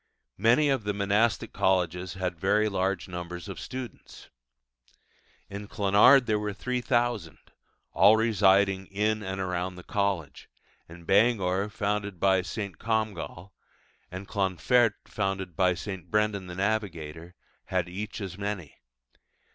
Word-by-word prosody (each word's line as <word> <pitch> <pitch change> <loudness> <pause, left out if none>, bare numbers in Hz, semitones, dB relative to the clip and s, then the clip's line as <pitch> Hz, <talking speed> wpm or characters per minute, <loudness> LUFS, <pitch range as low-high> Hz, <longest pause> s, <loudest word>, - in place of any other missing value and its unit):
Many 120 +8 +4
of 135 -5 +1
the 105 0 -2
monastic 105 +3 +1
colleges 90 -1 0
had 90 -3 -3
very 105 +4 +2
large 95 -2 -1
numbers 90 -1 -6
of - - -7
students. 125 -5 -8 1.2
In 100 +1 -7
Clonard 105 +7 +5
there 105 -2 +1
were 105 -1 -3
3,000, 120 -6 -1 0.5
all 105 +3 +6
residing 100 -3 +3
in 105 +2 0
and 95 -1 -4
around 90 0 -2
the 90 - -11
college; 100 -9 -2 0.4
and 85 +1 -12
Bangor 100 -2 +2
founded 105 -2 -2
by 95 0 +3
St. 100 -1 -6
Comgall, 105 -5 -3 0.6
and 95 +2 -8
Clonfert 105 +4 +2
founded 95 -3 -3
by 90 -2 +3
St. 95 -2 -7
Brendan 105 -3 0
the 90 - -7
Navigator, 90 -5 -3 0.3
had 90 -2 -1
each 105 +5 -6
as 95 -1 -6
many. 100 -7 -5
100 Hz, 125 wpm, -27 LUFS, 90-105 Hz, 1.2 s, all